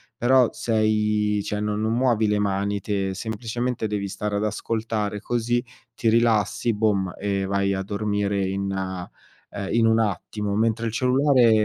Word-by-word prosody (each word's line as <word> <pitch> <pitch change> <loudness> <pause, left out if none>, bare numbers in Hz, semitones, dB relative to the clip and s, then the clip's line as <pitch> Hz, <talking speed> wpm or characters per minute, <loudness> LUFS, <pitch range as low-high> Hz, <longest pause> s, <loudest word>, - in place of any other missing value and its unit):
però 125 +1 +4
sei, 105 -2 +1
cioè 105 - -3
non 105 0 -1
non 110 +1 0
muovi 120 -3 +2
le 105 0 +2
mani 100 0 0
te, 95 -1 -2
semplicemente 115 +3 -3
devi 105 -1 -2
stare 105 +1 -3
ad 100 - 0
ascoltare, 110 -1 -2
così 120 +3 -1 0.3
ti 115 - +1
rilassi, 115 0 +2
bom, 100 -4 +1
e 100 -1 -1
vai 100 0 0
a 95 - -2
dormire 100 -1 -1
in, 100 +1 -2
ehm, 95 +1 -6
in 115 -1 +4
un 110 0 +4
attimo. 105 0 -2
Mentre 115 +1 +1
il 115 - -1
cellulare 130 0 +4
105 Hz, 155 wpm, -24 LUFS, 100-115 Hz, 0.3 s, però